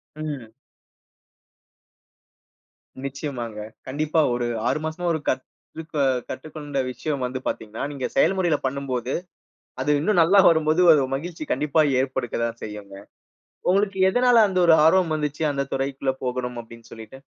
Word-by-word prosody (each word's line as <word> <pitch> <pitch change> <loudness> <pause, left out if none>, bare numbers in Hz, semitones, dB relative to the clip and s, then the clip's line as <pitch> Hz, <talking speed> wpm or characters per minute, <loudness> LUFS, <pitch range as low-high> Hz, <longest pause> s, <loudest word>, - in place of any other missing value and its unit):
ம். 145 -8 -6 2.5
நிச்சயமாங்க. 130 -5 -5 0.3
கண்டிப்பா. 155 +4 +1
ஒரு 120 0 -1 0.2
6 140 - +1
மாசமா 160 +3 -4
ஒரு 160 - -1
கத்துக் 155 +5 -6
அ - - +4 0.3
கற்றுக்கொண்ட 145 +1 -5
விஷயம் 140 +2 -3
வந்து 130 +1 -4
பார்த்தீங்கன்னா, 110 0 -4
நீங்க 135 -3 -4
செயல்முறையில 190 - +3
பண்ணும்போது 130 -2 -2 0.7
அது 145 - +1
இன்னும் 190 +3 +2
நல்லா 185 +5 +5
வரும்போது 160 +1 +2
ஒரு 150 -4 +5
மகிழ்ச்சி 160 +3 -6
கண்டிப்பா 150 +3 +2 0.2
ஏற்படுக்கதான் 120 -3 -3
செய்யும்ங்க. 105 -2 -8 0.7
உங்களுக்கு 195 +1 +2
எதனால 245 +1 +5
அந்த 185 -1 0
ஒரு 165 -1 +7
ஆர்வம் 165 0 +4
வந்துச்சு 150 0 -3
அந்தத் 140 -1 -3
துறைக்குள்ள 135 0 -1
போகணும் 125 -1 -3
அப்பிடின்னு 115 0 -15
சொல்லிட்டு? 115 +4 -11
140 Hz, 125 wpm, -24 LUFS, 125-160 Hz, 2.5 s, ஒரு